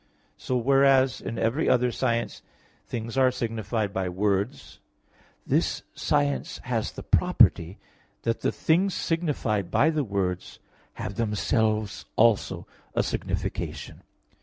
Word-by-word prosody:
So, 130 - -2
whereas 135 +1 +4
in 115 - -5
every 125 +8 +1
other 125 0 +3
science 115 -2 -1 0.5
things 115 +2 -3
are 130 -1 +5
signified 115 -4 -2
by 95 -1 -1
words, 100 +4 -2 0.7
this - - 0
science 70 -2 0
has - - -2
the - - -8
property, 85 +4 +3 0.5
that 115 0 -1
the - - +1
things 185 +4 +1
signified 140 - -1
by 160 +3 +3
the 155 -2 0
words 95 -5 -3 0.4
have 100 - -6
themselves 110 -1 0
also 115 -2 +2 0.3
a - - +3
signification. - - -4
115 Hz, 115 wpm, -26 LUFS, 100-130 Hz, 0.7 s, are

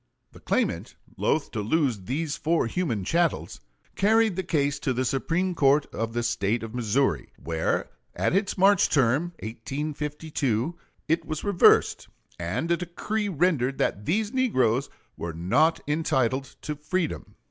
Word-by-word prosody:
The - - -15
claimant, - - -1 0.2
loath 155 -1 0
to 110 - -3
lose 115 - 0
these 145 - -2
four 165 -2 +1
human 115 - -1
"chattels," 170 - 0 0.4
carried 220 -1 +3
the 190 - -1
case 145 -5 0
to 135 -2 -1
the 130 +1 -1
Supreme 170 +8 0
Court 145 -2 +3
of 115 +1 -3
the 120 0 -1
State 115 -1 0
of 115 0 -7
Missouri, 120 - 0
where 80 -1 -2 0.2
at - - +1
its 195 +1 0
March 195 +1 +5
term, 135 +3 +3 0.2
1852, 145 +2 -3 0.3
it 165 +2 +1
was 155 -1 -5
reversed, 200 -4 +4 0.3
and 90 - -2
a 170 - +3
decree 205 +5 -3
rendered 150 -7 +1
that 105 - -1
these 210 - 0
negroes 130 - +2 0.3
were 85 -1 -4
not 95 - +2
entitled 135 -4 0
to 150 - -3
freedom. 160 +3 -3
145 Hz, 145 wpm, -26 LUFS, 120-170 Hz, 0.4 s, March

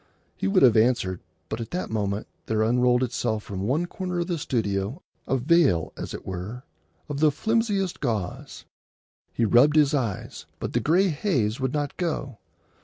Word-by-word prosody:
He - - -2
would 95 - +4
have 120 -4 +7
answered, 110 -5 +2 0.3
but 110 - -4
at 115 - -6
that 180 -7 -4
moment 100 -1 -1 0.2
there 110 -1 +1
unrolled 125 +2 +3
itself 115 -3 -1
from 95 -2 -5
one 150 +8 +1
corner 180 0 -4
of 170 - 0
the 175 -2 -2
studio 110 - -2 0.2
a 135 - +2
veil, 135 - +3
as - - -6
it - - -9
were, 95 +7 -6 0.4
of 145 -1 -4
the 155 0 +5
flimsiest 205 +1 0
gauze. 110 -9 -3 0.7
He 115 - 0
rubbed 130 +7 +5
his 150 -1 +4
eyes, 115 -9 -3
but - - -5
the - - +2
gray 185 +5 +3
haze 140 - 0
would 130 0 -1
not 145 -2 -2
go. 145 -8 -3
125 Hz, 175 wpm, -25 LUFS, 110-155 Hz, 0.7 s, have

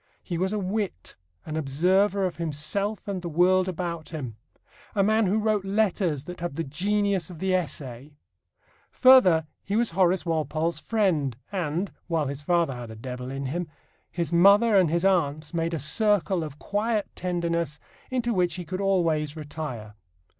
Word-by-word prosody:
He 170 -2 -3
was 190 +1 0
a 215 - -1
wit, 195 - -3 0.3
an 155 - -5
observer 185 +7 +2
of 180 - -3
himself 170 +7 -2
and 195 -2 -3
the 170 - -4
world 180 +3 +3
about 170 -3 -4
him, 135 -9 -6 0.6
a 200 - +3
man 215 +1 +3
who 200 +4 +2
wrote 215 -2 +1
letters 195 -7 0
that 180 +3 -8
have 170 -4 -4
the 165 - -2
genius 195 +4 0
of 175 - -9
the 190 +3 0
essay. 145 -5 -3 0.7
Further, 190 - +6 0.2
he 200 - -2
was 235 -2 +2
Horace 185 +1 +2
Walpole's 160 0 -1
friend, 160 - 0
and 180 0 -2 0.2
(while 165 -3 0
his 140 +1 -5
father 170 -1 +1
had 120 -2 -7
a 110 - -8
devil 125 +2 -6
in 135 +1 -4
him) 170 +6 -3 0.4
his 170 -2 -3
mother 200 +6 +6
and 185 -4 +5
his 170 +3 +1
aunts 155 -5 +1
made 165 0 -1
a - - -3
circle 185 - +1
of 150 -2 -7
quiet 210 +4 -1
tenderness 170 -4 -2 0.3
into 240 -2 0
which 180 -3 +1
he 180 -2 -6
could 185 +4 -4
always 165 -6 +1
retire. 145 -8 -6
175 Hz, 170 wpm, -26 LUFS, 150-195 Hz, 0.7 s, Further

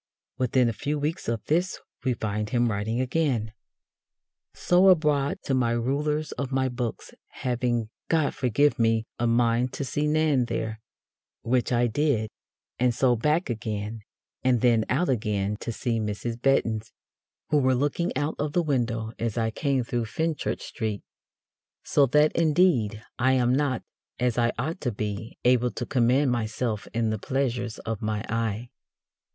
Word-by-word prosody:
Within 125 0 +3
a 115 - 0
few 145 +6 -2
weeks 150 +3 -3
of 115 -2 -2
this 175 +4 0 0.2
we 130 -2 +1
find 105 -1 -2
him 120 0 +2
writing 110 +3 -1
again: 130 -5 0 1.0
So 180 +2 +4
abroad 150 -5 +3
to 135 - -1
my 120 -3 +2
ruler's 145 +5 -1
of 140 -1 -4
my 130 0 +1
books, 120 -2 -4
having, 120 -3 -2 0.2
God 160 -3 +2
forgive 135 +3 +2
me! 115 -1 +2
a 120 - +1
mind 120 +1 +2
to 140 - -3
see 145 +3 -1
Nan 150 -4 +2
there, 110 -1 -3 0.6
which 125 +2 +1
I 120 0 +3
did, 120 -3 0 0.5
and 125 -1 +2
so 125 -1 +3
back 150 +9 +1
again, 110 -1 -4 0.4
and 125 -3 +3
then 115 -3 +4
out 150 +8 +1
again 105 -4 0
to 115 - -4
see 115 0 -1
Mrs. 110 +2 -3
Bettons, 115 -5 +1 0.6
who 150 - +5
were 130 -1 +3
looking 145 +6 0
out 150 +2 0
of 150 0 -2
the 175 - +2
window 120 -6 -1
as 115 -1 -2
I 110 -1 +1
came 135 +1 0
through 120 0 -2
Fenchurch 160 +6 -3
Streete. 110 -3 -3 0.8
So 140 -2 +3
that, 150 +4 +4
indeed, 155 - +2 0.2
I 130 +1 +3
am 125 -1 +3
not, 135 -3 0 0.4
as 125 -1 +1
I 120 0 +3
ought 155 +9 -3
to 125 - -1
be, 105 +1 -5
able 125 0 +4
to 120 +2 -5
command 130 +2 +2
myself 110 -1 -2
in 115 -1 0
the 110 - -2
pleasures 120 -2 -2
of 115 -2 -3
my 105 -1 -2
eye. 115 +1 -2
125 Hz, 160 wpm, -26 LUFS, 115-140 Hz, 1.0 s, who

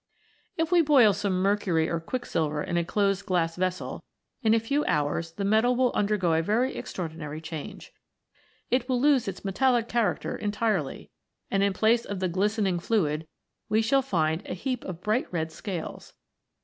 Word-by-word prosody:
If 325 +1 0
we 350 -1 +6
boil 270 -9 +6
some 195 -2 -1
mercury 190 -5 +2
or 170 - -1
quicksilver 160 -7 -2
in - - -3
a 170 - +2
closed 195 +2 0
glass 165 -3 +1
vessel, 185 0 -3 0.4
in 225 -2 +4
a - - +3
few 280 +7 0
hours 155 +2 0
the 200 +3 -3
metal 220 +5 +3
will 250 0 +2
undergo 200 -5 +1
a 160 - +3
very 230 +9 0
extraordinary 160 -3 -5
change. 160 -2 -8 0.8
It 255 0 +1
will 250 -1 +2
lose 275 -3 +3
its 195 +1 -6
me 195 - -1
tallic 240 +1 +2
character 235 -3 0
entirely, 210 -7 -2 0.4
and 195 - +2
in 200 0 +2
place 225 +4 +3
of 200 -2 -5
the 185 -1 0
glis 205 +5 0
tening 190 -5 0
fluid 160 -7 0 0.4
we 220 +1 +3
shall 270 +4 +3
find 160 -9 0
a - - -4
heap 250 +6 -3
of 180 -2 -6
bright 215 +4 0
red 160 -2 -2
scales. 180 -5 -6
200 Hz, 175 wpm, -27 LUFS, 170-230 Hz, 0.8 s, we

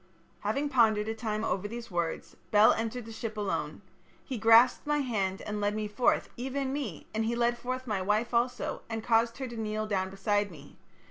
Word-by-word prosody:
"Having 275 +8 -1
pondered 220 -5 +3
a - - 0
time 220 -1 -3
over 200 -2 -1
these 235 0 -7
words, 170 -2 -3
Bel 210 +1 +6
entered 225 +1 -3
the 225 - -9
ship 220 -1 -5
alone. 205 -2 -3 0.4
He 255 -5 -4
grasped 230 +6 +6
my 295 0 +2
hand 195 -7 -1
and 210 0 -4
led 205 +1 +1
me 215 -1 -2
forth, 210 +4 +1
even 265 +2 -2
me, 250 - -4
and 220 +1 0
he 230 +2 0
led 240 0 +2
forth 255 +2 -4
my 210 -5 -1
wife 210 +5 0
also, 240 +2 0
and 225 -1 -3
caused 230 0 +2
her 265 -1 -4
to 235 - -8
kneel 215 0 -2
down 190 -3 -1
beside 205 +1 0
me. 145 -5 -13
225 Hz, 200 wpm, -30 LUFS, 210-240 Hz, 0.4 s, Bel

